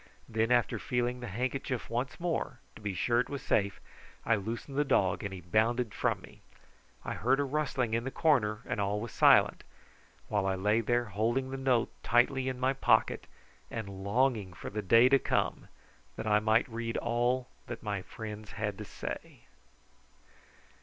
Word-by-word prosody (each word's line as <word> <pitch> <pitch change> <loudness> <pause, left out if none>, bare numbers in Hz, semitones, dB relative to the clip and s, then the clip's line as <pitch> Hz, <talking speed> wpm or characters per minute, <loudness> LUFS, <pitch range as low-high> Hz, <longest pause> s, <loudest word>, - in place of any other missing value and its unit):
Then 115 +1 0
after 120 -2 +2
feeling 125 0 -1
the 120 - -6
handkerchief 130 +3 -3
once 125 +3 -3
more, 170 -6 -2 0.2
to - - -12
be 100 -2 -3
sure 120 +6 +2
it 125 - 0
was 140 -1 -5
safe, 100 -3 +1 0.5
I 115 - +3
loosened 115 +6 -5
the 145 - +3
dog 100 -8 +2
and 100 - -3
he 95 -2 -7
bounded 110 +6 +1
from - - 0
me. - - -15 0.6
I - - -2
heard 130 +5 +2
a - - +3
rustling 135 -5 -1
in 115 0 +1
the 135 - -2
corner, 125 -9 +2
and - - -2
all 100 +1 0
was 115 0 -5
silent, - - +5 0.6
while 105 -2 0
I 95 - +1
lay 105 +4 +2
there 120 +2 +1
holding 115 +6 -1
the - - -3
note 130 -3 +1
tightly 130 +2 +2
in 130 -1 -5
my 130 +1 +2
pocket 110 -4 +2 0.4
and 100 -4 -6
longing 110 -3 +1
for - - -8
the 105 +1 -2
day 115 +5 +6
to 135 +1 +5
come - - -1 0.5
that - - -5
I 105 -1 +4
might 110 +3 +3
read 115 -1 -3
all 120 +2 0 0.2
that 120 -1 -7
my 100 -3 -2
friends 105 +2 -8
had 105 -2 -3
to - - -5
say. - - -7
115 Hz, 180 wpm, -31 LUFS, 105-130 Hz, 0.6 s, day